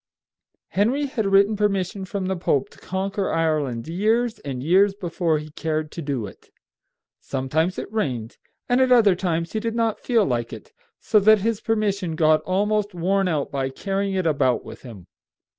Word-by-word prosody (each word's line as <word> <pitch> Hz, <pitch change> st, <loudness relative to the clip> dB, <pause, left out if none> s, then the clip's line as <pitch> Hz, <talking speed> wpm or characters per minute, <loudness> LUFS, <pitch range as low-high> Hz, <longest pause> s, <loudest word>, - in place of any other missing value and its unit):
Henry 245 Hz, +9 st, +1 dB
had 245 Hz, -7 st, -2 dB
written 200 Hz, +2 st, +4 dB
permission 195 Hz, -2 st, -1 dB
from 190 Hz, 0 st, -4 dB
the 190 Hz, +1 st, -1 dB
Pope 145 Hz, -6 st, 0 dB
to -, -, -18 dB
conquer 195 Hz, +1 st, -2 dB
Ireland 150 Hz, -7 st, -1 dB
years 220 Hz, +7 st, 0 dB
and 130 Hz, -3 st, -5 dB
years 195 Hz, +5 st, +4 dB
before 170 Hz, -4 st, -1 dB
he 150 Hz, 0 st, -8 dB
cared 155 Hz, 0 st, -3 dB
to 170 Hz, -, -6 dB
do 140 Hz, -7 st, -3 dB
it. 95 Hz, -, -13 dB, 0.7 s
Sometimes 155 Hz, +7 st, -1 dB
it -, -, -6 dB
rained, 125 Hz, -, -2 dB, 0.3 s
and 245 Hz, +1 st, +3 dB
at 260 Hz, -1 st, +3 dB
other 225 Hz, -6 st, +6 dB
times 170 Hz, -2 st, -2 dB
he 220 Hz, -, 0 dB
did 230 Hz, +1 st, -3 dB
not 230 Hz, -2 st, 0 dB
feel 230 Hz, -5 st, +2 dB
like 120 Hz, -5 st, -2 dB
it, -, -, -11 dB, 0.3 s
so 210 Hz, -, +3 dB
that 215 Hz, 0 st, +5 dB
his 225 Hz, 0 st, -1 dB
permission 200 Hz, -6 st, -1 dB
got 155 Hz, -1 st, +3 dB
almost 205 Hz, +1 st, 0 dB
worn 190 Hz, +3 st, +1 dB
out 155 Hz, -5 st, -1 dB
by 135 Hz, -1 st, -1 dB
carrying 195 Hz, +6 st, -2 dB
it 185 Hz, -2 st, 0 dB
about 140 Hz, -5 st, +1 dB
with -, -, -10 dB
him. 110 Hz, -9 st, -11 dB
185 Hz, 175 wpm, -23 LUFS, 155-210 Hz, 0.7 s, other